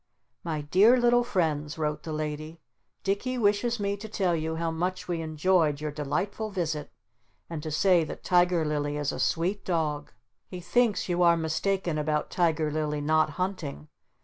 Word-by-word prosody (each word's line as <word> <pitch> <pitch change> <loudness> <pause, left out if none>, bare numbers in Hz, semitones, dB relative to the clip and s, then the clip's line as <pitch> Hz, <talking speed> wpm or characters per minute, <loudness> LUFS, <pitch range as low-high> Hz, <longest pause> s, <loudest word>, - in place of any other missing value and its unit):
"My 160 -3 -2
dear 200 +12 +5
little 240 0 +4
friends," 160 -9 -1
wrote 150 -1 -2
the 160 - -6
Lady, 155 +1 -4 0.4
"Dicky 205 +6 -1
wishes 225 +2 +1
me 200 0 0
to 215 +2 -8
tell 185 -5 +1
you 160 0 -2
how 165 0 -1
much 180 +3 -3
we 170 -2 -2
enjoyed 155 -1 +1
your 150 0 -3
delightful 190 +9 -2
visit, 160 -6 -3 0.6
and 160 -2 -4
to 155 - -5
say 175 +2 +3
that - - -8
Tiger 175 -2 +3
Lily 145 -1 -1
is 145 -1 -1
a - - -6
sweet 180 +5 0
dog. 155 -4 -1 0.4
He 180 - -7
thinks 210 +4 +1
you 175 -1 0
are 170 -1 +5
mistaken 165 +1 -1
about 150 0 -1
Tiger 160 -3 +1
Lily 150 -1 -1
not 155 +1 +3
hunting. 180 - -4
165 Hz, 170 wpm, -27 LUFS, 150-190 Hz, 0.6 s, dear